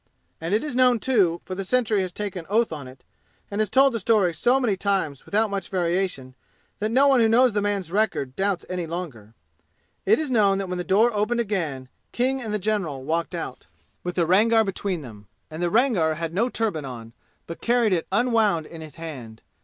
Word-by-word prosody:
And 170 +5 0
it 220 - 0
is 295 -5 -4
known, 250 -1 +4
too, 200 -10 +2
for 185 - -6
the 195 +1 -4
sentry 220 -1 +1
has 185 -1 -3
taken 190 -3 -5
oath 225 +3 +2
on 145 -4 -7
it 130 +1 -14 0.5
and 205 +2 -1
has 215 - 0
told 270 +3 +4
the 230 - -1
story 200 -4 +2
so 245 - +2
many 230 -7 +1
times 190 -8 -2
without 215 +1 +1
much 195 -3 -3
variation 175 -7 -1 0.5
that 215 +1 -1
no 260 +5 +4
one 270 -2 +5
who 225 -1 +4
knows 245 +1 +4
the 205 - 0
man's 200 -4 -2
record 190 -10 0
doubts 195 -2 -1
any 180 -2 -4
longer 140 - -7 0.7
it 435 - +4
is 310 -4 -3
known 200 -5 +3
that 195 -1 -3
when 180 0 -4
the - - -2
door 220 +6 +3
opened 215 +3 0
again 165 - -2 0.3
King 265 +2 0
and 220 -3 -5
the 210 - 0
general 190 -10 -2
walked 165 +4 -2
out, - - -6 0.4
with 180 0 -4
the 170 - +2
Rangar 220 +6 +4
between 195 -3 -3
them. 105 -6 -12 0.2
And 160 +2 -6
the 175 - +1
Rangar 205 - +2
had 165 0 -4
no 230 +7 +1
turban 215 -11 -2
on, 115 -4 -8 0.3
but 165 - -9
carried 235 -4 +2
it 165 -3 -1
unwound 215 -6 +2
in 165 0 -10
his 155 -3 -10
hand. 130 -9 -9
195 Hz, 210 wpm, -24 LUFS, 165-225 Hz, 0.7 s, one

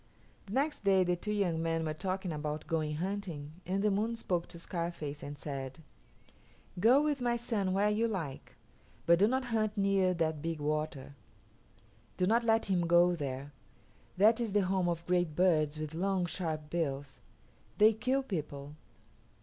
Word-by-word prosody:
The 195 - -7
next 290 +1 0
day 195 -2 +4
the 180 0 +1
two 210 +4 -4
young 180 -6 0
men 165 0 0
were 155 - -1
talking 185 +2 -3
about 150 0 -4
going 155 -2 -1
hunting 175 -3 -5
and 195 +2 0
the 210 - +3
Moon 220 +4 0
spoke 180 -6 -1
to - - -10
Scarface 170 -4 -4
and 145 +1 -7
said, 135 -3 -5 1.0
"Go 245 +9 +5
with 295 -3 0
my 240 -1 +1
son 225 -5 -1
where 200 +2 +2
you 225 +2 +1
like, 165 -11 -5 0.5
but 170 +1 +5
do 205 - +5
not 260 +2 0
hunt 215 -1 0
near 195 -2 +2
that 160 -3 -1
big 165 0 -3
water. 150 -2 -2 1.0
Do 180 - +2
not 230 +5 +3
let 225 0 +3
him 180 -3 +1
go 175 +1 +5
there. 140 -2 -5 0.6
That 220 +5 +5
is 225 -4 -2
the 205 - +4
home 185 -1 +1
of 170 0 -3
great 175 -3 +1
birds 155 -4 +3
with 155 0 -5
long, 185 +2 0
sharp 160 -4 -4
bills. 140 -5 -2 0.6
They 215 +1 +6
kill 255 +5 0
people. 150 - -5
180 Hz, 170 wpm, -32 LUFS, 155-205 Hz, 1.0 s, They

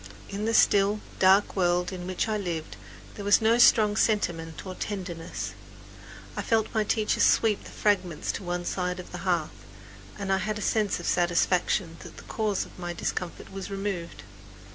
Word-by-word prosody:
In 200 +2 -3
the 225 - 0
still, 205 0 +4 0.2
dark 195 +2 +4
world 180 -1 +1
in 180 -1 -6
which 185 +4 -1
I 215 - 0
lived 170 -6 -4 0.4
there 205 - -8
was 205 0 +5
no 225 +2 +3
strong 210 -3 +6
sentiment 170 -8 0
or 185 - -5
tenderness. 180 - -5 0.8
I - - -2
felt 220 -1 0
my 220 -1 +2
teacher 210 0 0
sweep 220 -3 +3
the - - -9
fragments 185 -6 0
to - - -6
one 175 0 -3
side 180 0 -2
of 180 - -9
the 180 - -6
hearth, 165 - -2 0.5
and 195 -1 -1
I 190 - +2
had 215 +3 -2
a 210 - -4
sense 210 -5 +1
of 175 - -7
satisfaction 175 0 +1
that - - -12
the - - -10
cause 215 -3 -1
of - - -16
my 175 -1 -4
discomfort 175 +1 -4
was 195 0 -6
removed. 195 -3 -4
190 Hz, 180 wpm, -27 LUFS, 175-210 Hz, 0.8 s, strong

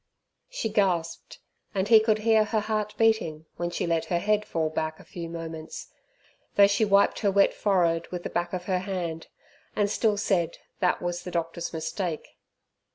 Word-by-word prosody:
She - - -3
gasped, 185 -6 -1 0.4
and 190 0 0
he 220 0 +8
could 215 0 +2
hear 220 -1 +5
her 215 0 0
heart 215 0 -2
beating 220 -9 +1
when 175 0 -2
she 175 - -2
let 165 -1 0
her 175 +1 0
head 210 +4 +1
fall 160 -2 -1
back 155 0 -3
a - - -13
few 170 -2 -7
moments; 165 -1 -7 0.7
though 200 - +8
she 200 +2 +2
wiped 200 -1 +3
her 205 - +2
wet 200 0 +4
forehead 170 -5 +1
with 175 -1 -6
the - - -5
back 175 0 -1
of 180 -1 -4
her 185 -2 0
hand, 180 -4 -4 0.5
and 205 -1 +1
still 215 -2 +1
said 175 -5 0 0.2
that 180 -1 +1
was 175 0 -2
the - - -7
doctor's 170 0 -3
mistake. 165 0 -4
180 Hz, 180 wpm, -27 LUFS, 165-210 Hz, 0.7 s, he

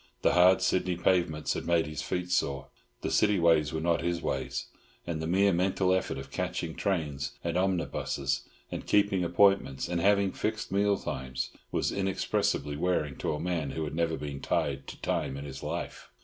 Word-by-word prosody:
The - - +4
hard 90 +1 +6
Sydney 90 -1 +1
pavements 85 -4 +1
had - - -5
made 85 -1 +3
his 75 -2 -5
feet 90 0 -3
sore. 70 -6 0 0.3
The - - -2
city 105 -1 +3
ways 80 -3 +4
were 80 - -2
not 85 +1 +1
his 85 0 -1
ways, - - -2 0.4
and 80 -2 -3
the 80 - -2
mere 95 +3 +3
mental 95 +1 +2
effort 95 - -1
of 70 +1 -8
catching 80 +3 -3
trains 75 -9 -2
and 85 0 -2
omnibuses, 85 -7 0 0.3
and - - -5
keeping 100 -3 +3
appointments, 90 -5 +3
and 85 -1 -1
having 100 0 +3
fixed 110 +2 -3
meal 100 +1 +3
times, 65 -3 -4 0.2
was - - 0
inexpressibly 95 -6 0
wearing 75 -4 0
to - - -1
a - - -5
man 85 -4 -1
who 80 +4 -3
had 75 - -4
never 80 0 0
been 70 -2 -5
tied 70 0 -1
to - - -9
time 65 - -1
in 70 - -6
his 70 -1 -7
life. - - -5
85 Hz, 185 wpm, -29 LUFS, 75-95 Hz, 0.4 s, hard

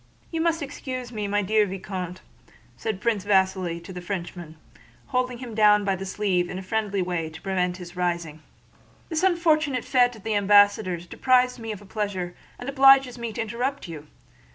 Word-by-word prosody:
"You 325 -1 -1
must 330 -1 +1
excuse 255 -3 -6
me, 210 -3 -3 0.2
dear 210 +1 +3
Vicomte," 185 -1 -5 0.5
said 215 -3 -4
Prince 220 -4 0
Vasíli 190 -4 +1
to 190 - -9
the 180 - -6
Frenchman, 175 -3 -6 0.5
holding 250 -1 0
him 240 -2 -8
down 210 -1 +5
by 195 -1 +1
the 195 +1 -6
sleeve 185 -3 0
in 180 - -5
a 190 - -6
friendly 200 -1 -1
way 175 -3 -2
to 160 - -11
prevent 180 -2 -1
his 175 -1 -10
rising. 170 -3 -2 0.7
"This 320 -1 -1
unfortunate 315 -8 +2
fete 245 -2 +3
at 215 - -14
the 220 - -1
ambassador's 205 -3 +4
deprives 250 +5 +2
me 225 -1 -5
of 205 -1 -7
a - - -15
pleasure, 190 -4 -3 0.2
and 245 - -8
obliges 270 -2 +5
me 235 -1 -3
to 235 - -2
interrupt 240 +3 -3
you. 155 -3 -9
205 Hz, 175 wpm, -25 LUFS, 180-250 Hz, 0.7 s, down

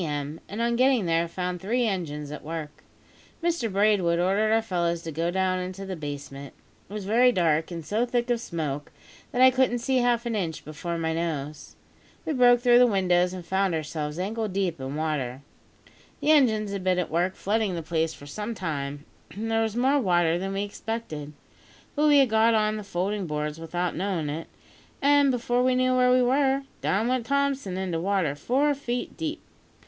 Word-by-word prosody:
m., 145 0 -4
and 215 +4 -3
on 235 0 +1
getting 255 -4 +3
there 165 0 +1
found 180 0 -4
three 240 +5 0
engines 150 -8 -3
at 150 - -7
work. 155 -1 -6 0.6
Mr 335 -10 0
Braidwood 195 -4 +3
ordered 195 +5 +2
our 225 - +4
fellows 170 -4 -1
to 165 - -5
go 165 +3 -1
down 185 0 0
into 185 +2 -5
the 190 -1 -4
basement. 145 -2 -7 0.3
It - - -10
was 210 -2 -5
very 240 +5 +4
dark, 165 -6 +1
and 165 -3 -6
so 220 +8 0
thick 240 0 0
of 235 -1 0
smoke 150 -7 -4 0.4
that 250 - +3
I 260 - +8
couldn't 255 -1 +2
see 260 +2 0
half 240 -1 +2
an 235 -1 -1
inch 170 -6 -3
before 170 +3 -4
my 160 -1 -1
nose. 155 -3 -4 0.5
We 315 - -1
broke 245 -2 +5
through 245 -1 +6
the 250 - +7
windows, 180 -4 +2
and 180 -2 -7
found 190 0 +1
ourselves 150 -1 -4
ankle 215 +4 -2
deep 190 -5 -2
in 135 +2 -5
water. 140 -4 -2 0.8
The 305 - +2
engines 220 -9 +3
had 200 -2 -4
been 185 -1 +2
at 180 - -2
work 175 +3 0
flooding 210 -2 0
the 165 - -4
place 160 0 0
for 145 - -13
some 210 +10 -5
time, 145 -5 -4 0.2
and 225 +3 -5
there 225 0 +2
was 220 -1 -1
more 265 +4 +3
water 175 -6 +2
than 195 +1 -3
we 195 +1 -1
expected; 205 -8 -5 0.6
but 300 0 +3
we 295 -1 +6
had 270 -3 +5
got 225 +1 +4
on 215 0 +1
the 210 - -6
folding 195 0 -2
boards 150 0 -3
without 175 +2 -2
knowing 180 -4 -2
it, 155 +3 -5 0.5
an' 285 0 +4
before 245 -1 +1
we 255 0 +3
knew 255 0 +2
where 250 0 +4
we 250 0 +4
were, 270 +2 +2 0.2
down 210 +4 +1
went 250 -2 -1
Thompson 275 -9 0
into 185 -3 -2
water 185 -5 0
four 265 - +1
feet 245 -3 -4
deep. 320 -1 -4
190 Hz, 195 wpm, -26 LUFS, 165-240 Hz, 0.8 s, I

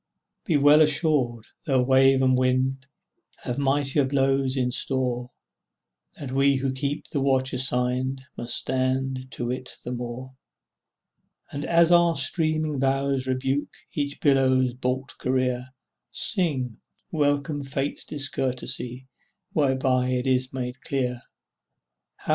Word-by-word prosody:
Be 165 -6 +2
well 145 +2 +6
assured, 140 -7 +1 0.2
though 130 -3 +3
wave 135 +1 +4
and 130 -1 +4
wind 130 +1 0 0.6
Have 125 - -3
weightier 140 +1 +1
blows 135 0 +1
in 125 -1 0
store, 125 -2 -1 0.9
That 135 -3 -7
we 135 +1 +3
who 135 0 -1
keep 140 +3 -3
the 140 - -1
watch 130 -1 +1
assigned 130 +1 0
Must 120 - -4
stand 130 0 -1
to 120 0 -3
it 130 0 -6
the 125 - -5
more; 125 +1 -6 1.2
And 145 +1 -4
as 170 0 +4
our 170 -1 +5
streaming 155 -4 0
bows 135 0 0
rebuke 135 +2 -1 0.2
Each 145 -1 -3
billow's 130 -3 +3
baulked 125 +1 -3
career, 125 -1 0 0.4
Sing, 135 - -1 0.3
welcome 145 -1 0
Fate's 140 +1 -1
discourtesy 130 -3 -3 0.5
Whereby 130 -4 +1
it 125 0 -1
is 130 -1 +1
made 125 0 -5
clear, 125 -3 -2 1.0
etc. - - -11
130 Hz, 120 wpm, -25 LUFS, 130-140 Hz, 1.2 s, well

